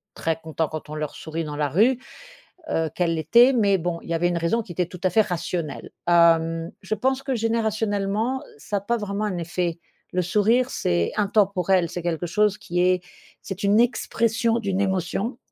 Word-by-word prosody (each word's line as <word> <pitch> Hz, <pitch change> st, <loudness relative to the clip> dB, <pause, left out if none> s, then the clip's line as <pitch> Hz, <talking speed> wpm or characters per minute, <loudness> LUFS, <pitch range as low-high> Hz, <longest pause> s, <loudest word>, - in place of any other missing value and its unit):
très 165 Hz, -1 st, -1 dB
contents 160 Hz, 0 st, -2 dB
quand 155 Hz, 0 st, -7 dB
on 150 Hz, -, -6 dB
leur 150 Hz, -1 st, -4 dB
sourit 160 Hz, +1 st, -4 dB
dans 150 Hz, -1 st, -5 dB
la 145 Hz, -1 st, 0 dB
rue, 235 Hz, -, +3 dB, 0.7 s
heu, 160 Hz, -, 0 dB
quelle 170 Hz, -2 st, +1 dB
l'était? 235 Hz, -, +5 dB
Mais 205 Hz, -6 st, +3 dB
bon 170 Hz, -1 st, -3 dB
il -, -, -14 dB
y -, -, 0 dB
avait 170 Hz, +1 st, +1 dB
une 175 Hz, -, -1 dB
raison 170 Hz, +8 st, +1 dB
qui 185 Hz, -, -11 dB
était 180 Hz, +1 st, 0 dB
tout 180 Hz, +1 st, -11 dB
à 185 Hz, -, +3 dB
fait 220 Hz, +5 st, +4 dB
rationnelle. 170 Hz, -4 st, -4 dB, 0.2 s
Hem, 165 Hz, -1 st, +3 dB
je 205 Hz, +3 st, -2 dB
pense 265 Hz, +3 st, 0 dB
que 265 Hz, -2 st, -1 dB
générationnellement 220 Hz, +1 st, 0 dB, 0.2 s
ça 205 Hz, +7 st, -3 dB
a -, -, -3 dB
pas 235 Hz, +4 st, 0 dB
vraiment 210 Hz, -1 st, -2 dB
un 190 Hz, -4 st, -2 dB
effet. 170 Hz, 0 st, -2 dB, 0.3 s
Le 180 Hz, 0 st, 0 dB
sourire, 225 Hz, +7 st, +2 dB
c'est 85 Hz, -1 st, 0 dB
intemporel, 195 Hz, -3 st, +2 dB
c'est 175 Hz, -, -4 dB
quelque 170 Hz, 0 st, -2 dB
chose 210 Hz, +3 st, +2 dB
qui 175 Hz, +1 st, -3 dB
est, 180 Hz, 0 st, +2 dB, 0.4 s
c'est 195 Hz, -1 st, -6 dB
une 205 Hz, +2 st, +4 dB
expression 230 Hz, -1 st, +1 dB
d'une 195 Hz, -3 st, -1 dB
émotion. 195 Hz, +5 st, -1 dB
185 Hz, 195 wpm, -24 LUFS, 170-215 Hz, 0.7 s, l'était